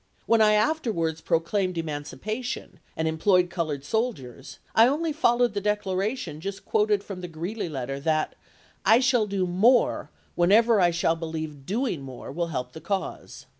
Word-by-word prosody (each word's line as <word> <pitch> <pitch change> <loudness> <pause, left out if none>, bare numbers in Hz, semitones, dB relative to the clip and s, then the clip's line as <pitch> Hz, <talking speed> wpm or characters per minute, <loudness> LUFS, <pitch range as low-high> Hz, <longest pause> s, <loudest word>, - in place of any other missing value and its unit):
When 230 -1 +4
I 215 0 +5
afterwards 210 - 0
proclaimed 180 +3 0
emancipation, 165 - -5 0.2
and 160 - 0
employed 180 +2 +2
colored 155 -5 -3
soldiers, 145 - -3 0.2
I 225 +1 +7
only 310 +4 0
followed 240 -6 +2
the 205 - -2
declaration 200 - -2
just 195 +1 -6
quoted 420 -2 +2
from 190 -3 -7
the 180 - -5
Greeley 175 +5 -4
letter 135 -1 -4
that 155 +1 0 0.3
' - - -32
I 230 - +7
shall 250 -4 +2
do 195 -2 0
more 210 +8 +3 0.2
whenever 210 +5 +4
I 175 - +5
shall 165 -1 +1
believe 160 -4 -6
doing 220 - -1
more 130 -1 -8
will 170 +4 -2
help 125 -5 -4
the 160 - -9
cause.' 190 +4 -4
185 Hz, 160 wpm, -26 LUFS, 160-225 Hz, 0.3 s, I